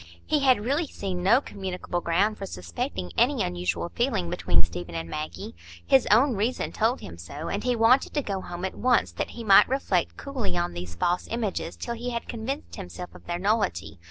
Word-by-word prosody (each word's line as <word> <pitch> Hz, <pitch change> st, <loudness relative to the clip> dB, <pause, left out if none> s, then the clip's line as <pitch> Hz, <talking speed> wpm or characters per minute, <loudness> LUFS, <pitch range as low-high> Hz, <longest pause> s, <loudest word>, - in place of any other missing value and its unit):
He 305 Hz, -, +2 dB
had 255 Hz, -6 st, +4 dB
really 290 Hz, +6 st, +1 dB
seen 190 Hz, -7 st, -4 dB
no 230 Hz, +9 st, +5 dB
communicable 185 Hz, -5 st, -4 dB
ground 200 Hz, +6 st, +1 dB
for 195 Hz, -, -4 dB
suspecting 90 Hz, -, -4 dB
any 250 Hz, +3 st, +3 dB
ususual 90 Hz, -, -2 dB
feeling 215 Hz, -9 st, 0 dB
between 90 Hz, -, +2 dB
Stephen 85 Hz, 0 st, -5 dB
and 80 Hz, 0 st, -3 dB
Maggie; 80 Hz, +3 st, -5 dB, 0.3 s
his 130 Hz, +10 st, +5 dB
own 240 Hz, +5 st, +5 dB
reason 220 Hz, +6 st, -1 dB
told 230 Hz, +4 st, +1 dB
him 85 Hz, -2 st, -9 dB
so, 140 Hz, -, -6 dB
and 200 Hz, -, -2 dB
he 250 Hz, -1 st, +2 dB
wanted 230 Hz, +4 st, +4 dB
to 290 Hz, -, +1 dB
go 195 Hz, -4 st, -2 dB
home 175 Hz, +1 st, -5 dB
at 190 Hz, -, -3 dB
once 250 Hz, -1 st, +2 dB
that -, -, -3 dB
he 235 Hz, -, -7 dB
might 200 Hz, -3 st, +7 dB
reflect 270 Hz, +1 st, 0 dB
coolly 240 Hz, -11 st, -3 dB
on 175 Hz, 0 st, -1 dB
these 85 Hz, -1 st, -6 dB
false 175 Hz, -, 0 dB
images, 215 Hz, -7 st, -2 dB
till 235 Hz, -, -3 dB
he 240 Hz, +1 st, -4 dB
had 235 Hz, -1 st, -4 dB
convinced 245 Hz, +5 st, -5 dB
himself 180 Hz, -2 st, -7 dB
of -, -, -15 dB
their 175 Hz, 0 st, -1 dB
nullity. 195 Hz, -, 0 dB
195 Hz, 200 wpm, -26 LUFS, 145-235 Hz, 0.3 s, might